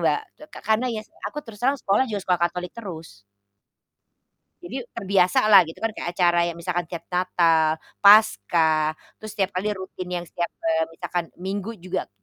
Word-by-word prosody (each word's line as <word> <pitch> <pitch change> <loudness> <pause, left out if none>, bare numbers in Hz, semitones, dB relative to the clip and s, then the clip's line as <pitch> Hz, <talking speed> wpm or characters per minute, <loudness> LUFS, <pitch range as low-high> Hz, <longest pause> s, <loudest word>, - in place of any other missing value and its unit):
Mbak, - - +2 0.2
le - - -10
ka - - -9
karena 220 +4 +2
ya 225 -3 -3 0.3
aku 295 - -8
terus 215 -4 -12
terang 270 +3 +2
sekolah 210 +6 +2
juga 210 -2 -3
sekolah 180 -2 +1
Katolik 180 +1 -3
terus. 165 - -9 1.4
Jadi 250 +10 -5
terbiasalah 195 +1 +4
gitu 165 - -11
kan 225 - +1
kayak 175 - -4
acara 175 -1 +4
ya - - -5
misalkan 175 0 -2
tiap 170 -1 -7
Natal, 165 -3 +2 0.2
Paskah, 160 - +5 0.2
terus 215 - -7
setiap 200 0 0
kali 185 +3 -1
rutin 185 -1 -7
yang 175 -1 -3
setiap, 170 0 -3 0.2
eee, 160 0 +2
misalkan 175 +1 -3
Minggu 200 +4 -4
juga 180 - -4
180 Hz, 165 wpm, -24 LUFS, 170-205 Hz, 1.4 s, Paskah